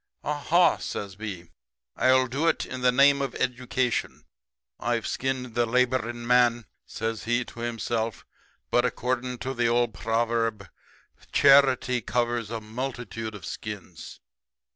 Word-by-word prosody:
"'Aha!' 155 Hz, +4 st, +3 dB
says 100 Hz, -2 st, -5 dB
B, 95 Hz, -5 st, -7 dB, 0.4 s
'I'll 130 Hz, 0 st, +4 dB
do 135 Hz, +6 st, -1 dB
it 165 Hz, -, +1 dB
in 130 Hz, 0 st, -6 dB
the 125 Hz, 0 st, +4 dB
name 140 Hz, +2 st, +5 dB
of 135 Hz, -3 st, -3 dB
Education. 125 Hz, -1 st, -1 dB, 0.6 s
I've 120 Hz, 0 st, -1 dB
skinned 130 Hz, -2 st, -2 dB
the 120 Hz, 0 st, +1 dB
laboring 120 Hz, -1 st, 0 dB
man,' 120 Hz, -1 st, +3 dB, 0.2 s
says 115 Hz, 0 st, -4 dB
he 120 Hz, +2 st, +1 dB
to -, -, -12 dB
himself, 115 Hz, -1 st, -3 dB, 0.5 s
'but, -, -, +4 dB
according 125 Hz, +1 st, -2 dB
to 130 Hz, -, -2 dB
the 120 Hz, -2 st, +1 dB
old 120 Hz, -1 st, +2 dB
proverb, 115 Hz, -1 st, -1 dB, 0.6 s
"Charity 135 Hz, -3 st, +5 dB
covers 120 Hz, -1 st, -1 dB
a 115 Hz, 0 st, -3 dB
multitude 115 Hz, -1 st, -5 dB
of 95 Hz, -, -9 dB
skins."' -, -, -8 dB
120 Hz, 130 wpm, -26 LUFS, 115-130 Hz, 0.6 s, name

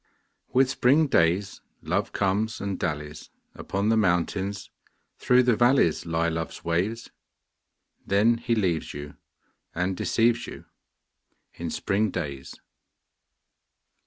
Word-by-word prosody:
With 130 Hz, +1 st, +4 dB
spring 135 Hz, +4 st, +3 dB
days 90 Hz, -, +1 dB, 0.2 s
Love -, -, -1 dB
comes 105 Hz, +3 st, -1 dB
and 100 Hz, -1 st, -4 dB
dallies: 75 Hz, -3 st, -4 dB, 0.2 s
Upon 100 Hz, +2 st, -2 dB
the 115 Hz, -, +3 dB
mountains, 95 Hz, +1 st, 0 dB, 0.5 s
through 125 Hz, 0 st, +4 dB
the 125 Hz, -2 st, +3 dB
valleys 120 Hz, -, +3 dB
Lie 85 Hz, 0 st, 0 dB
Love's 80 Hz, 0 st, -4 dB
ways. 95 Hz, +8 st, -1 dB, 0.9 s
Then 110 Hz, +4 st, +2 dB
he 120 Hz, 0 st, 0 dB
leaves 90 Hz, -10 st, -1 dB
you 75 Hz, 0 st, -8 dB, 0.6 s
and 90 Hz, +2 st, -1 dB
deceives 115 Hz, +5 st, +1 dB
you -, -, -10 dB, 0.9 s
In -, -, -5 dB
spring 105 Hz, +2 st, 0 dB
days. 70 Hz, -6 st, -5 dB
100 Hz, 110 wpm, -26 LUFS, 85-115 Hz, 0.9 s, With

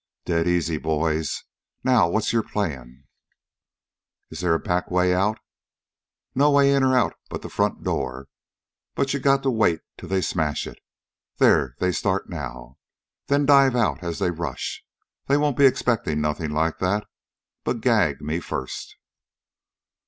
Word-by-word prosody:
"Dead 85 Hz, 0 st, +1 dB
easy, 85 Hz, -3 st, +1 dB
boys. 80 Hz, 0 st, -1 dB, 0.4 s
Now 120 Hz, -9 st, +4 dB
what's 110 Hz, +5 st, 0 dB
your 115 Hz, -, +3 dB
plan?" 70 Hz, -, -4 dB, 1.3 s
"Is 80 Hz, -, -7 dB
there 90 Hz, -2 st, +2 dB
a -, -, 0 dB
back 90 Hz, 0 st, -1 dB
way 90 Hz, 0 st, +2 dB
out?" 100 Hz, +4 st, +1 dB, 1.0 s
"No 145 Hz, +2 st, +4 dB
way 140 Hz, -1 st, +5 dB
in 140 Hz, -, +3 dB
or 130 Hz, -1 st, +3 dB
out 120 Hz, -, +2 dB, 0.2 s
but -, -, -6 dB
the -, -, -8 dB
front -, -, -1 dB
door. 65 Hz, +2 st, -3 dB, 0.7 s
You 140 Hz, 0 st, 0 dB
got 135 Hz, +1 st, +3 dB
to 135 Hz, -, +2 dB
wait 105 Hz, -8 st, +2 dB, 0.2 s
till -, -, -9 dB
they 95 Hz, 0 st, +1 dB
smash 80 Hz, -5 st, -1 dB
it. -, -, -10 dB, 0.6 s
There 65 Hz, -3 st, +3 dB
they 90 Hz, -, +1 dB
start -, -, -1 dB
now! 60 Hz, +1 st, -7 dB, 0.5 s
Then 140 Hz, 0 st, +2 dB
dive 135 Hz, -2 st, +5 dB
out, 115 Hz, -5 st, +1 dB
as 85 Hz, -1 st, -3 dB
they 95 Hz, -3 st, 0 dB
rush. 80 Hz, -5 st, -5 dB, 0.4 s
They 140 Hz, -, +3 dB
won't 145 Hz, -2 st, +1 dB
be 140 Hz, +1 st, +6 dB
expecting 120 Hz, -, 0 dB
nothing 75 Hz, +1 st, -1 dB
like 80 Hz, +2 st, 0 dB
that. 100 Hz, +3 st, 0 dB, 0.6 s
But -, -, -2 dB
gag -, -, +2 dB
me 75 Hz, +3 st, -2 dB
first." 65 Hz, -6 st, -6 dB
90 Hz, 150 wpm, -24 LUFS, 80-125 Hz, 1.3 s, be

